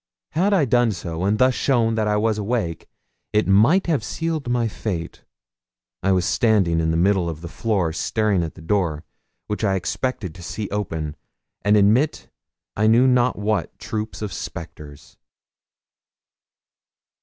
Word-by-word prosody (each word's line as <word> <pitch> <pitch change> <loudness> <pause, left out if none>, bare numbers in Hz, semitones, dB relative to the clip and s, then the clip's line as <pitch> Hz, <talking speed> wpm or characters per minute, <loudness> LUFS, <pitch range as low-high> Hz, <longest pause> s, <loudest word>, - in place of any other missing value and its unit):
Had 185 +7 +1
I 185 -8 +3
done 120 -2 +3
so, 85 -1 -4
and 105 +2 +2
thus 130 +3 +4
shown 120 -4 +1
that 110 -1 0
I 105 0 +2
was 110 0 +1
awake, 105 -6 -2 0.4
it 105 0 +2
might 115 - +4
have 160 -5 0
sealed 160 -5 -3
my 120 -1 +1
fate. 90 -6 -5 0.8
I 95 +2 +1
was 90 -2 +2
standing 100 -8 +2
in 80 0 +1
the 80 - +1
middle 90 -1 +2
of 80 -1 -6
the 85 - -6
floor 95 -4 -1
staring 105 +1 0
at 80 -2 -4
the 85 - -12
door, 80 -4 0 0.4
which 105 +1 -4
I 100 -2 +2
expected 95 +1 -3
to 95 - -12
see 100 +5 -5
open, 80 -7 -3 0.5
and 105 +3 +4
admit 110 +10 +2 0.4
I 105 +1 +2
knew 115 +3 +5
not 125 -1 +3
what 105 +1 -1
troop 110 0 -5
of 100 -5 -4
spectres. 75 -2 -9
105 Hz, 155 wpm, -22 LUFS, 85-120 Hz, 0.8 s, knew